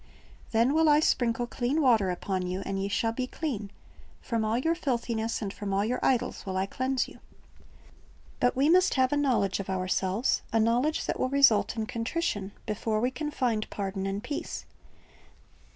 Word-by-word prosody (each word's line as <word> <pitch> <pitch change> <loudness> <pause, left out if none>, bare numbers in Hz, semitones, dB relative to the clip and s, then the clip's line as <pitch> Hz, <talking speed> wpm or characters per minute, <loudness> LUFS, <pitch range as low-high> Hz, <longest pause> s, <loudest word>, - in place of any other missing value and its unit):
"Then 235 +4 +3
will 320 0 +4
I 295 0 +6
sprinkle 240 -5 +1
clean 245 +5 -1
water 230 -9 +4
upon 180 0 -2
you, 185 +2 -3
and 195 0 -2
ye 195 - -1
shall 225 +3 0
be 255 +2 -3
clean; 245 -10 -4 0.5
from 230 -3 -2
all 220 +2 +1
your 320 +7 +1
filthiness 235 -8 -2
and 200 -1 -4
from 200 -1 -3
all 200 +1 +2
your 250 +3 -1
idols 255 -3 0
will 190 -1 -3
I 190 - +1
cleanse 260 +5 -1
you." - - -14 0.6
' - - -27
But 245 - +2
we 270 +3 +3
must 365 +3 +4
have 260 0 +3
a - - +3
knowledge 245 -10 +1
of 195 - -5
ourselves, 190 +4 0
a 225 - +2
knowledge 240 +8 +1
that - - -2
will 255 - +1
result 275 -6 +4
in 220 - -1
contrition, 230 - -2
before 215 0 -1
we 250 +3 +1
can 295 +4 -4
find 240 -7 -1
pardon 195 -1 -3
and 195 +2 -3
peace. 285 +3 -5
230 Hz, 185 wpm, -28 LUFS, 200-265 Hz, 0.6 s, I